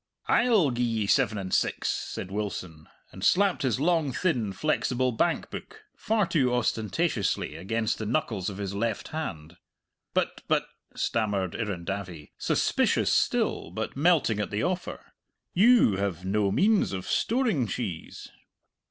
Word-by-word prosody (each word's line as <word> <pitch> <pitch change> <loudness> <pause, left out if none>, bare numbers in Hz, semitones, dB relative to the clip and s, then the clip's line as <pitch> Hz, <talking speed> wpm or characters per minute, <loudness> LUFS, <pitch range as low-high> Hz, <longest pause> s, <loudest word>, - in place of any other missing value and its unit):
"I'll 220 - +4
gi'e 120 0 -2
ye 115 -3 0
seven 110 0 +2
and 95 -2 -4
six," - - +1
said 95 - -3
Wilson, 90 -6 -5 0.2
and 95 - -10
slapped 195 0 +3
his 130 -4 0
long 160 -2 +2
thin 125 - 0
flexible 130 +1 0
bank 165 +9 0
book 435 0 -9
far 215 -2 +1
too 130 -7 +1
ostentatiously 115 - 0
against 110 +5 -2
the 110 - -3
knuckles 110 -7 -1
of 95 - -7
his 100 -1 -4
left 110 +1 -2
hand. 85 - -6 0.6
"But - - 0
but," - - +2 0.3
stammered 100 -5 -1
Irrendavie, 95 -6 -5
suspicious - - +2
still, - - +1
but - - -4
melting 145 - +3
at 105 - -1
the 105 +1 -2
offer, 180 0 -3 0.5
"you 205 - +5
have 95 -3 -2
no 100 +1 +1
means 205 - +3
of 95 -1 -4
storing 225 - +1
cheese." 100 -8 -5
115 Hz, 140 wpm, -27 LUFS, 100-160 Hz, 0.6 s, you